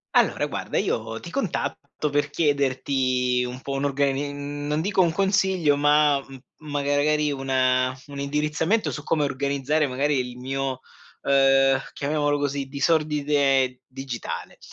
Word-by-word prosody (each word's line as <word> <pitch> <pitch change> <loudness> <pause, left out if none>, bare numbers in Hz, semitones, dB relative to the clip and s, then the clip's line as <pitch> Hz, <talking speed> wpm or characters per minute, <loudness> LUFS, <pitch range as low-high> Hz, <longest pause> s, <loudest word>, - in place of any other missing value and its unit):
Allora, - - +3
guarda, - - -4
io 115 0 -1
ti 170 - -10
contatto 155 - -3
per 145 0 +1
chiederti 130 -4 +1
un 125 +1 -7
po' 140 - -6
un'organi 140 0 0
mhmm, 145 0 -6
non 150 +1 0
dico 195 +2 +2
un 170 -2 +3
consiglio, 190 -4 +2
ma 145 0 +4
m 135 0 -12 0.2
magari 145 0 0
una 130 -1 +1
un 140 -1 -8
indirizzamento 150 +8 0
su 150 - -5
come 155 -2 +1
organizzare, 140 +2 0
magari, 140 +2 0
il 125 -1 -4
mio, 135 0 -3 0.4
ehm, 135 -1 +4
chiamiamolo 145 0 0
così, 140 -1 -2
disordine 140 -3 +1
digitale. 130 -2 -6
140 Hz, 130 wpm, -24 LUFS, 135-150 Hz, 0.4 s, ma